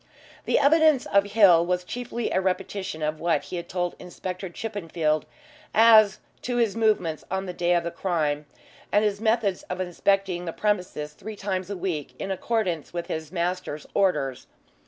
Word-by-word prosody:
The -, -, +2 dB
evidence 310 Hz, -1 st, +4 dB
of 200 Hz, 0 st, +3 dB
Hill 185 Hz, -6 st, +7 dB
was 180 Hz, +1 st, -1 dB
chiefly 240 Hz, +3 st, -4 dB
a 190 Hz, -, +2 dB
repetition 190 Hz, -2 st, -2 dB
of 155 Hz, 0 st, -1 dB
what 170 Hz, 0 st, +1 dB
he 180 Hz, -, -6 dB
had 170 Hz, -, -6 dB
told 175 Hz, -1 st, -2 dB
Inspector 185 Hz, +1 st, -6 dB
Chippenfield 165 Hz, -6 st, -2 dB, 0.5 s
as 215 Hz, -2 st, +7 dB, 0.2 s
to 245 Hz, -1 st, -2 dB
his 230 Hz, -4 st, +2 dB
movements 215 Hz, -8 st, +1 dB
on 190 Hz, +1 st, -2 dB
the 180 Hz, -, -5 dB
day 175 Hz, 0 st, +1 dB
of 170 Hz, -, +1 dB
the 170 Hz, -, -3 dB
crime, 155 Hz, -5 st, -1 dB, 0.4 s
and 210 Hz, +1 st, +3 dB
his 205 Hz, 0 st, -1 dB
methods 220 Hz, -4 st, +1 dB
of 180 Hz, -, -4 dB
inspecting 185 Hz, 0 st, 0 dB
the 165 Hz, -, -4 dB
premises 180 Hz, -8 st, -1 dB
three 215 Hz, +7 st, -8 dB
times 190 Hz, -2 st, -3 dB
a 200 Hz, -, -4 dB
week 170 Hz, -6 st, -3 dB
in 195 Hz, -, -4 dB
accordance 190 Hz, -5 st, -1 dB
with 170 Hz, -1 st, -4 dB
his 160 Hz, -1 st, -5 dB
master's 175 Hz, -4 st, -3 dB
orders. 140 Hz, -10 st, 0 dB
185 Hz, 170 wpm, -25 LUFS, 170-205 Hz, 0.5 s, Hill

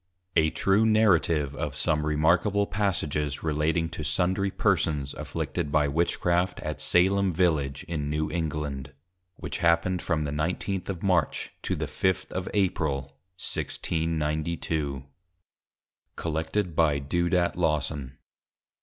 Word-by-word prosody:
A 80 Hz, 0 st, +4 dB
TRUE 100 Hz, +6 st, +2 dB
NARRATIVE 85 Hz, -10 st, +3 dB
of -, -, -4 dB
some 75 Hz, -1 st, +1 dB
Remarkable 85 Hz, +7 st, +3 dB
Passages 75 Hz, -8 st, -1 dB
relating 80 Hz, +2 st, +1 dB
to 80 Hz, -, -6 dB
sundry 95 Hz, +7 st, +2 dB
Persons 75 Hz, -6 st, 0 dB
afflicted 75 Hz, -, -3 dB
by 75 Hz, -1 st, +3 dB
Witchcraft 85 Hz, +4 st, +1 dB
at -, -, -4 dB
Salem 95 Hz, +2 st, +3 dB
Village 80 Hz, -6 st, +1 dB
in 75 Hz, -3 st, -3 dB
New 75 Hz, +1 st, -1 dB
England, 75 Hz, -5 st, -3 dB, 0.4 s
which -, -, -5 dB
happened 85 Hz, +1 st, +2 dB
from 80 Hz, -2 st, 0 dB
the 75 Hz, -, -3 dB
19th. 90 Hz, +6 st, -2 dB
of 90 Hz, -3 st, -4 dB
March 90 Hz, -6 st, +1 dB
to -, -, -1 dB
the -, -, -2 dB
5th. 95 Hz, -1 st, -1 dB
of 95 Hz, 0 st, -3 dB
April, 80 Hz, -8 st, +1 dB, 0.4 s
1692. 80 Hz, -4 st, -2 dB, 1.1 s
COLLECTED 80 Hz, +3 st, -2 dB
BY 75 Hz, -3 st, +3 dB
DEODAT 85 Hz, +5 st, +1 dB
LAWSON. 75 Hz, -6 st, -1 dB
80 Hz, 120 wpm, -27 LUFS, 75-90 Hz, 1.1 s, A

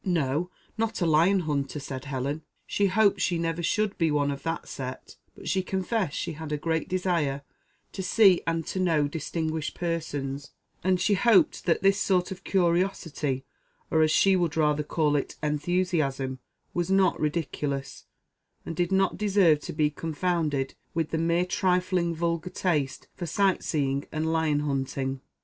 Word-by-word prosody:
"No, 165 Hz, -1 st, 0 dB, 0.3 s
not 225 Hz, 0 st, -1 dB
a 175 Hz, -, +1 dB
lion 170 Hz, +5 st, +4 dB
hunter," 145 Hz, -2 st, -2 dB
said 135 Hz, -1 st, -6 dB
Helen; 140 Hz, +2 st, -3 dB, 0.2 s
she 200 Hz, -, +1 dB
hoped 200 Hz, +1 st, +3 dB
she 175 Hz, -, +1 dB
never 165 Hz, 0 st, -1 dB
should 210 Hz, +4 st, 0 dB
be 165 Hz, -2 st, +3 dB
one 145 Hz, -1 st, +1 dB
of 140 Hz, 0 st, -5 dB
that 165 Hz, +2 st, -3 dB
set, 130 Hz, -1 st, -7 dB, 0.2 s
but -, -, -10 dB
she 190 Hz, -, +1 dB
confessed 190 Hz, -1 st, -1 dB
she 170 Hz, -, -2 dB
had 160 Hz, -1 st, -7 dB
a 150 Hz, -, 0 dB
great 160 Hz, +1 st, -1 dB
desire 170 Hz, -7 st, 0 dB, 0.5 s
to 195 Hz, -, -5 dB
see 190 Hz, -1 st, +5 dB
and 165 Hz, -1 st, 0 dB
to 190 Hz, -, -3 dB
know 160 Hz, -5 st, +2 dB
distinguished 160 Hz, 0 st, -3 dB
persons, 145 Hz, -5 st, -3 dB, 0.3 s
and 185 Hz, 0 st, +2 dB
she 205 Hz, -, +2 dB
hoped 215 Hz, +1 st, +4 dB
that 170 Hz, +1 st, +1 dB
this 195 Hz, +1 st, +4 dB
sort 185 Hz, -2 st, +1 dB
of 190 Hz, 0 st, -7 dB
curiosity, 170 Hz, -7 st, 0 dB, 0.5 s
or 160 Hz, -, +4 dB
as 155 Hz, -, +4 dB
she 195 Hz, +4 st, +4 dB
would 170 Hz, -3 st, 0 dB
rather 150 Hz, -1 st, +2 dB
call 150 Hz, 0 st, +1 dB
it 140 Hz, -, -2 dB
enthusiasm, 150 Hz, -4 st, 0 dB, 0.3 s
was 175 Hz, 0 st, -1 dB
not 190 Hz, -1 st, +3 dB
ridiculous, 145 Hz, -3 st, -2 dB, 0.6 s
and 165 Hz, -, -5 dB
did 175 Hz, +1 st, 0 dB
not 195 Hz, 0 st, +2 dB
deserve 195 Hz, -7 st, +4 dB
to -, -, -6 dB
be 150 Hz, -1 st, +1 dB
confounded 155 Hz, -3 st, -1 dB, 0.2 s
with 165 Hz, -2 st, -1 dB
the 160 Hz, -, 0 dB
mere 170 Hz, +2 st, +2 dB
trifling 180 Hz, -2 st, +1 dB
vulgar 170 Hz, +1 st, -1 dB
taste 150 Hz, -8 st, -1 dB
for 175 Hz, -, -5 dB
sight 195 Hz, +2 st, +2 dB
seeing 140 Hz, -2 st, -1 dB
and 160 Hz, +1 st, -1 dB
lion 155 Hz, -2 st, +1 dB
hunting. 135 Hz, -2 st, -2 dB
165 Hz, 165 wpm, -27 LUFS, 145-180 Hz, 0.6 s, see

